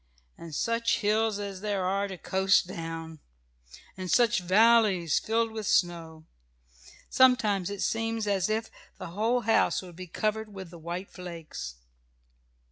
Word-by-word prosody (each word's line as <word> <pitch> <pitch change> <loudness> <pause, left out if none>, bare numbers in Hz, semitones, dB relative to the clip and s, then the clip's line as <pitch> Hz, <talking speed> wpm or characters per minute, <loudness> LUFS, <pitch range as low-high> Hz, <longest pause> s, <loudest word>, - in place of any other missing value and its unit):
And 165 -3 -9
such 230 +4 0
hills 215 0 +1
as 200 -2 -6
there 200 -3 -1
are 195 +2 0
to 190 -2 -7
coast 190 +2 +2
down! 165 -2 -7 0.8
and 185 -1 -6
such 235 +6 +4
valleys 195 -3 +4
filled 225 +1 0
with 220 -2 -5
snow! 165 -3 0 0.9
Sometimes 220 -8 +4
it 200 -1 -4
seems 225 -1 -1
as 200 -1 0
if 220 +1 -2 0.3
the - - -7
whole 225 +6 +1
house 225 -3 +2
would 175 -2 -12
be 185 +1 -8
covered 215 +4 -2
with 190 -3 -8
the 170 - -11
white 175 +4 -6
flakes. 165 - -8
195 Hz, 140 wpm, -28 LUFS, 175-220 Hz, 0.9 s, such